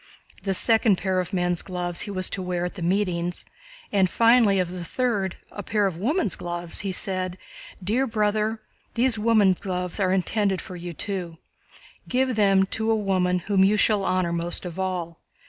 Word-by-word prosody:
The 195 -1 0
second 225 0 +3
pair 190 -1 0
of 180 0 -3
man's 180 -2 +1
gloves 175 -2 -2
he - - -2
was 185 -2 0
to 190 - -2
wear 180 -1 -2
at 180 - -4
the 190 - -9
meetings, 175 -1 -1 0.5
and 195 -3 +3
finally 230 -1 +4
of 180 -2 0
the 180 -1 -6
third, 200 -2 -1
a 205 - -6
pair 205 +1 0
of 190 -4 -1
women's 270 - 0
gloves, 175 -1 -3
he 195 -2 -2
said: 185 -1 -2 0.5
"Dear 240 +8 +1
brother, 215 0 0 0.4
these 240 -2 +2
woman's 210 -4 +3
gloves 180 0 -3
are 185 -2 +2
intended 195 +1 +1
for 185 - -8
you 175 0 -6
too. 175 -2 -5 0.7
Give 255 0 +1
them 195 -2 +4
to 220 +3 -2
the 225 - +3
woman 185 -4 0
whom 195 -2 +3
you 205 +2 +4
shall 210 -1 +3
honor 185 -2 0
most 170 +2 -3
of 180 +1 -6
all. 180 -3 -3
190 Hz, 180 wpm, -25 LUFS, 180-210 Hz, 0.7 s, finally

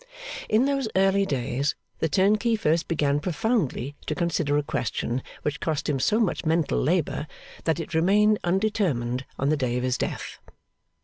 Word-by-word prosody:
In 225 +4 +4
those 275 -3 0
early 195 +1 +3
days, 135 0 -1 0.2
the 160 - +1
turnkey 210 +7 +3
first 165 -5 +1
began 145 -3 +1
profoundly 155 - -1
to - - -1
consider 165 -4 0
a 150 - +1
question 125 -3 -2 0.2
which 145 -1 -2
cost 155 -2 -2
him 140 -3 0
so 215 - +2
much 215 -7 0
mental 160 -1 +1
labour, 155 -1 0 0.4
that 160 -1 +1
it 165 - -6
remained 205 +6 +4
undetermined 175 - 0
on 140 - 0
the 155 - +2
day 125 -3 0
of 125 - -2
his 125 0 0
death. - - -4
160 Hz, 165 wpm, -26 LUFS, 140-195 Hz, 0.4 s, In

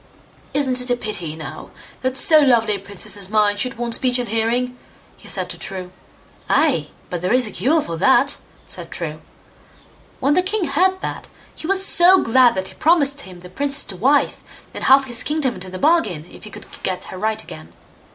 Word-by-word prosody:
"Isn't 260 -3 +3
it 250 - -2
a 245 - +2
pity, 185 -9 -3
now, 160 -1 -9 0.3
that 260 0 -1
so 310 +2 +7
lovely 235 -7 +3
a 200 - -2
princess 200 +1 -2
as 195 -2 -2
mine 210 -1 +2
should 255 +4 -2
want 235 -1 -3
speech 250 +1 +1
and 245 -1 -3
hearing", 235 +3 -1 0.4
he - - -17
said - - -2
to - - -9
True. 185 -2 -6 0.6
"Ay, 275 - +2 0.2
but 175 -2 -4
there 180 - -2
is 250 0 +3
a - - -6
cure 305 +3 +1
for 165 - -6
that", 265 +8 +3 0.3
said - - -5
True. - - -6 1.0
When 280 +1 +1
the 365 - +3
king 395 +2 -2
heard 370 +6 +1
that, - - -6 0.3
he 315 - -8
was 385 0 +3
so 370 +1 +6
glad 245 +1 +4
that 190 0 -4
he - - -11
promised 290 -3 +2
him 180 -2 -13
the 180 - -11
princess 280 +8 0
to 195 - -7
wife, 270 +9 +1 0.3
and - - -6
half 270 +1 +5
his 240 -3 0
kingdom 295 -4 -1
into 185 0 -8
the 185 - -7
bargain, 215 - +1
if - - -14
he - - -9
could - - -10 0.2
get 185 -1 -3
her - - -8
right 220 +1 -2
again. 80 +2 -11
245 Hz, 205 wpm, -19 LUFS, 195-285 Hz, 1.0 s, so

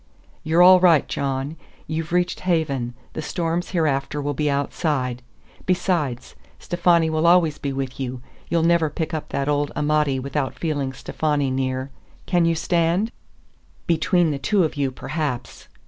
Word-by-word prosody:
"You're 165 +3 +4
all 185 0 +8
right, 170 -5 +5
John. 140 +2 -3 0.3
You've 160 +1 -4
reached 180 0 +1
haven; 140 -9 -1 0.2
the - - -4
storms 170 +2 -2
hereafter 150 -4 0
will 145 0 -2
be 150 +2 0
outside. 140 -3 -1 0.5
Besides, 175 -8 0 0.2
Stefani 170 -2 +2
will 160 +1 +2
always 170 -4 +4
be 140 - -3
with 135 0 -4
you. 130 -1 -4 0.3
You'll 165 0 +2
never 165 -2 +3
pick 160 +2 -4
up 155 - -4
that 140 0 -2
old 145 0 0
Amati 150 -2 +1
without 135 +1 -3
feeling 145 -5 -2
Stefani 145 0 -1
near. 130 0 -2 0.3
Can 175 -2 +2
you 165 0 +2
stand?" 170 +6 +1 0.7
"Between 170 0 +2
the 140 - -3
two 190 +8 +2
of 155 - -1
you, 140 -2 0
perhaps." 130 -3 -4
155 Hz, 150 wpm, -22 LUFS, 135-170 Hz, 0.7 s, all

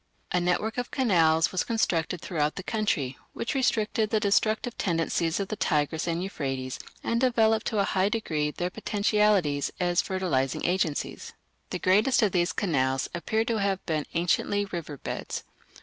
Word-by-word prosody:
A 180 - +2
network 195 +7 0
of 245 - -3
canals 165 -10 +3
was 185 - 0
constructed 180 -7 0
throughout 150 -4 -1
the 195 - -6
country, 180 - -1
which 235 - -3
restricted 220 -5 +1
the 220 - +2
destructive 215 +3 +1
tendencies 165 -2 0
of 200 -1 -3
the 215 - -2
Tigris 155 -3 0
and 170 +1 -1
Euphrates 135 -8 -4 0.2
and 235 +1 0
developed 225 -3 +3
to 220 - -1
a 200 - +4
high 195 0 +1
degree 160 -10 -1
their 175 +4 -3
potentialities 205 -8 +1
as 175 -1 +2
fertilizing 165 -9 -1
agencies. 175 -4 -1 0.4
The - - -2
greatest 210 +8 +3
of 205 - +3
these 175 -1 +1
canals 135 -7 0
appear 220 +6 0
to 230 -2 0
have 195 -2 -1
been 155 -3 -1
anciently 180 +4 +1
river 170 -6 -6
beds. - - -5
185 Hz, 160 wpm, -27 LUFS, 160-215 Hz, 0.4 s, a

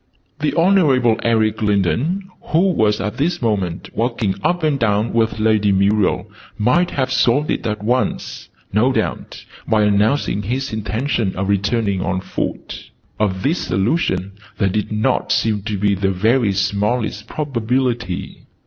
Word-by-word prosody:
The 150 0 -1
Honorable 150 - +3
Eric 110 -2 +1
Lindon, 115 - 0 0.2
who 180 +5 +2
was 105 -9 +1
at 105 +2 -3
this 170 +5 0
moment 95 -7 -1
walking 115 -4 -1
up 175 -1 0
and 150 -3 +1
down 105 -1 +1
with 115 -1 +1
Lady 110 -2 +3
Muriel, 100 +1 +2 0.3
might 150 +12 +2
have 130 -2 -1
solved 145 +5 +2
it - - -2
at 105 -1 -3
once, 125 +4 -2 0.2
no 115 +6 +3
doubt, - - -3 0.2
by 110 -1 +3
announcing 105 +2 +1
his 130 +5 -3
intention 110 0 -1
of 95 +1 -2
returning 100 0 0
on 95 -1 -1
foot. 95 - -5 0.3
Of 95 -3 0
this 160 +6 +1
solution 95 - 0 0.3
there 100 - +1
did 105 +3 -2
not 110 0 0
seem 105 -1 +1
to 105 -2 -2
be 100 +1 +2
the 95 0 0
very 110 +4 +2
smallest 105 +2 -1
probability. 125 -7 -2
110 Hz, 145 wpm, -19 LUFS, 100-130 Hz, 0.3 s, Honorable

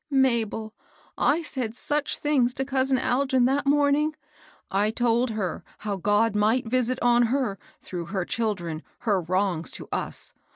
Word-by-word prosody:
" - - -62
Mabel, 235 -5 +1 0.4
I 320 +4 +2
said 250 -7 -3
such 295 +3 -1
things 265 -4 +1
to 265 - -1
cousin 265 -1 +2
Algin 260 0 +2
that 275 +2 +1
morning! 290 +2 +3 0.6
I 205 +2 +2
told 240 +2 +1
her 195 -6 -3
how 205 -2 -3
God 205 +3 +2
might 220 +5 +2
visit 250 +1 +1
on 240 -1 +4
her, 245 -6 -1 0.2
through 175 -2 -5
her 185 +1 -2
children, 180 -9 -2 0.2
her 205 -5 +1
wrongs 180 -1 0
to - - -6
us. - - -3
235 Hz, 155 wpm, -26 LUFS, 205-265 Hz, 0.6 s, on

